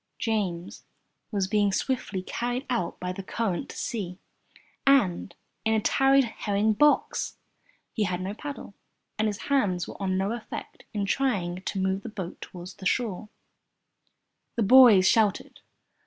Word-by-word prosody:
James 190 -6 -2 0.5
was 200 -3 0
being 205 0 +2
swiftly 200 -4 -2
carried 245 +6 -3
out 235 -8 -1
by 180 0 -3
the 195 - -6
current 215 +3 -2
to - - -9
sea 190 -6 -4 0.7
and 195 -10 +3 0.3
in 220 0 +2
a - - +3
tarred 270 +5 +4
herring 215 -2 0
box! 295 +7 +2 0.6
He 215 - 0
had 180 -1 -2
no 190 +2 -3
paddle, 280 -2 -7 0.5
and 215 - +2
his 205 0 -3
hands 205 -11 +1
were - - -10
of 195 - -1
no 190 +2 0
effect 235 -1 -7
in 205 -2 -2
trying 195 -8 0
to 195 - -3
move 190 +1 0
the 230 - -7
boat 190 -5 -7
toward 180 0 -9
the 190 - -9
shore. 215 -3 -1 1.3
The 230 - +1
boys 215 -4 +8
shouted. 215 -2 +2
205 Hz, 150 wpm, -27 LUFS, 185-235 Hz, 1.3 s, boys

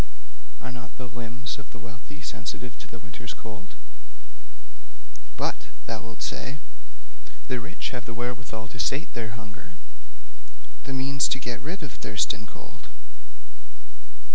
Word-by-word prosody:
Are 130 - -2
not 125 -1 -4
the 130 - -1
limbs 120 +3 -1
of 135 - -7
the - - -7
wealthy 115 +6 -6
sensitive 90 - 0
to - - -5
the 115 - -5
winter's 120 +1 -3
cold? 110 -4 -6 1.6
"But," - - +3 0.2
thou 115 -1 +1
wilt 115 -1 -3
say, 135 +3 +1 0.9
"the 125 - +4
rich 145 +8 0
have 125 -2 0
the 115 - -2
wherewithal 120 -2 0
to 120 - -5
sate 135 - +4
their 115 -1 0
hunger, 110 +11 -7 1.1
the 135 - +1
means 135 +1 +7
to - - +5
get 120 -2 0
rid 170 +5 0
of 135 - -2
thirst 105 0 +5
and - - -5
cold." - - -9
120 Hz, 140 wpm, -32 LUFS, 115-135 Hz, 1.6 s, means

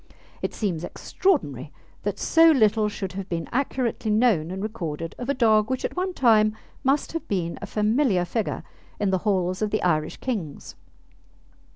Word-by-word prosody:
It - - -3
seems 180 -7 -2
extraordinary 150 - -1 0.3
that 205 -1 -2
so 330 +8 +5
little 220 -6 +4
should 195 -2 -5
have 195 0 -6
been 165 -2 -3
accurately 250 -4 -1
known 210 -7 +3
and 190 +2 -4
recorded 165 -7 -4
of 245 +1 -5
a 280 - +1
dog 220 -3 +3
which 260 -1 -1
at - - -4
one 370 +1 -1
time 215 -3 +4 0.3
must 275 +2 +1
have 330 - -5
been 175 -4 -2
a - - -5
familiar 210 -3 +2
figure 220 +3 -2 0.4
in 205 -2 +1
the 190 - +2
halls 185 -1 0
of 215 - +1
the 215 - -1
Irish 155 -3 +1
kings. 195 - -4
210 Hz, 170 wpm, -25 LUFS, 180-245 Hz, 0.4 s, so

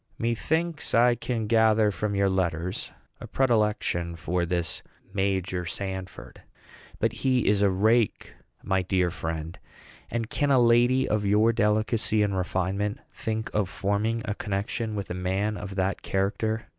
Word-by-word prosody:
Methinks 155 +8 -1
I 120 +1 +5
can 120 -1 -3
gather 110 -1 +4
from 100 +2 -2
your 100 0 +3
letters 90 -2 -1 0.3
a - - -8
predilection 105 -9 +1
for 85 +2 -1
this 85 -2 -1 0.3
Major 95 -2 -1
Sanford. 95 +1 -6 0.6
But 115 0 0
he 130 -1 +1
is 100 0 +3
a 100 - +4
rake, 110 +3 +1 0.3
my 95 0 +1
dear 90 -1 +1
friend; 80 0 -5 0.5
and 115 -2 -2
can 145 +5 0
a 135 - +5
lady 120 +2 +4
of 105 -1 0
your 105 +3 +3
delicacy 110 0 +1
and 100 -2 0
refinement 95 +4 -1
think 110 0 -3
of 105 -3 0
forming 105 +4 -1
a 105 - -1
connection 105 +2 -3
with 100 -3 -4
a - - -1
man 95 +4 -1
of 100 -1 -7
that 95 +1 -1
character? 105 +3 -1
105 Hz, 145 wpm, -26 LUFS, 95-115 Hz, 0.6 s, I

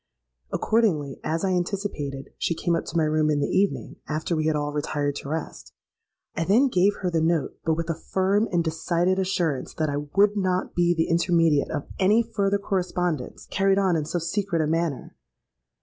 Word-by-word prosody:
Accordingly, 170 - +1
as 165 +4 -1
I 190 - +1
anticipated, 175 -7 -3
she 170 - 0
came 170 +1 0
up 165 - -2
to - - -3
my 160 - +3
room 155 0 +2
in 150 -1 +2
the 145 - -1
evening, 200 +1 0
after 155 +2 -2
we 155 0 0
had 155 - +2
all 145 0 -2
retired 145 -1 -1
to 140 - -7
rest. 160 +1 -5 0.6
I 165 - 0
then 230 +10 +4
gave 200 -1 +3
her 180 -2 -1
the 165 -1 +1
note, 160 -3 0
but 160 -1 +1
with 165 0 -3
a 165 - 0
firm 190 +6 0
and 175 -2 +2
decided 170 +3 0
assurance 175 -7 -1
that 155 -2 0
I 140 - -2 0.2
would 205 +1 +4
not 185 -2 0
be 175 0 +2
the 160 - +1
intermediate 165 -3 +2
of 145 -3 -3
any 210 +5 +4
further 200 -3 0
correspondence 180 -7 -2
carried 195 0 +2
on 190 -3 +2
in 155 -2 -1
so 165 +3 -2
secret 170 0 -1
a - - 0
manner. 160 -3 -2
170 Hz, 195 wpm, -25 LUFS, 155-190 Hz, 0.6 s, then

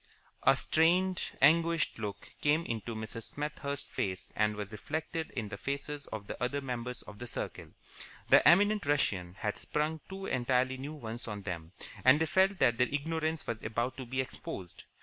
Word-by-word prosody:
A 135 - +6
strained, 175 +6 +2
anguished 165 -1 +4
look 100 -2 -5
came 155 +3 +3
into 115 0 -3
Mrs. 110 +1 -5
Smethurst's 145 -1 -3
face 95 0 -3
and 105 0 +2
was 105 0 -5
reflected 160 +8 -3
in 110 -4 -2
the 100 -1 -6
faces 140 +2 -4
of 110 -2 -6
the - - -7
other 140 +3 0
members 125 -2 -4
of 105 -1 -11
the 120 - -6
circle. - - -4 0.6
The - - +8
eminent 205 -1 +5
Russian 95 -11 +1
had 105 +1 -2
sprung 155 +1 -1
two 195 0 -6
entirely 130 0 +1
new 140 +4 -5
ones 120 -5 -5
on 105 -2 -5
them, 85 -3 -5 0.3
and 130 +4 +7
they 160 - +3
felt 190 +4 +3
that 120 -8 +3
their 125 - +4
ignorance 160 +2 -1
was 115 -1 -3
about 120 +3 -1
to 130 -2 -6
be 130 +2 0
exposed. 90 -8 -7
130 Hz, 175 wpm, -32 LUFS, 110-155 Hz, 0.6 s, The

